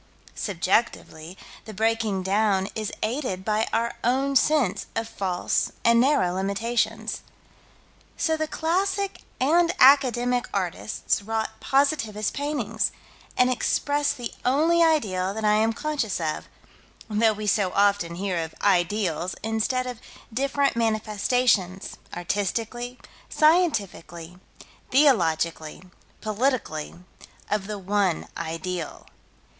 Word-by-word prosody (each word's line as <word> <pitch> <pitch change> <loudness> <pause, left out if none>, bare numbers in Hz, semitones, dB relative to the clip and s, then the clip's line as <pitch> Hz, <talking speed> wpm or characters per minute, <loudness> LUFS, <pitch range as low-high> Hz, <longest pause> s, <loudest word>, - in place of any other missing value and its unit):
Subjectively, 185 -3 -1 0.3
the 215 - -9
breaking 220 -2 0
down 195 0 +1
is 215 -2 -3
aided 215 -6 -2
by 215 +1 +1
our 235 +1 0
own 270 +3 +1
sense 270 -7 +2
of 225 0 -2
false 185 -5 -1
and 235 0 +5
narrow 260 -10 +2
limitations. 200 +5 -1 1.0
So 320 - +1
the 315 0 -2
classic 385 +5 -1 0.2
and 335 +6 +3
academic 250 -2 +4
artists 190 +2 -1
wrought 220 +1 -3
positivist 270 -7 +1
paintings, 240 -7 -1 0.5
and 250 0 +4
expressed 285 +3 0
the 240 -2 -5
only 315 +7 +3
ideal 200 - +2
that 220 0 -3
I 210 0 +4
am 220 +1 +2
conscious 275 -6 -2
of, 155 -2 -3 0.6
though 220 0 +2
we 210 0 -6
so 200 -2 +2
often 200 -4 +2
hear 185 -1 -2
of 160 - -9
"ideals" 180 -2 +1
instead 225 +3 0
of 250 -2 -6 0.3
different 275 +2 +1
manifestations, 215 -3 0 0.2
artistically, 225 +7 -3 0.3
scientifically, 200 - +1 0.5
theologically, 165 - +2 0.4
politically, 215 - -1 0.6
of 205 -2 -1
the 210 -1 -4
One 195 -2 0
Ideal. 165 0 -5
220 Hz, 105 wpm, -25 LUFS, 190-255 Hz, 1.0 s, and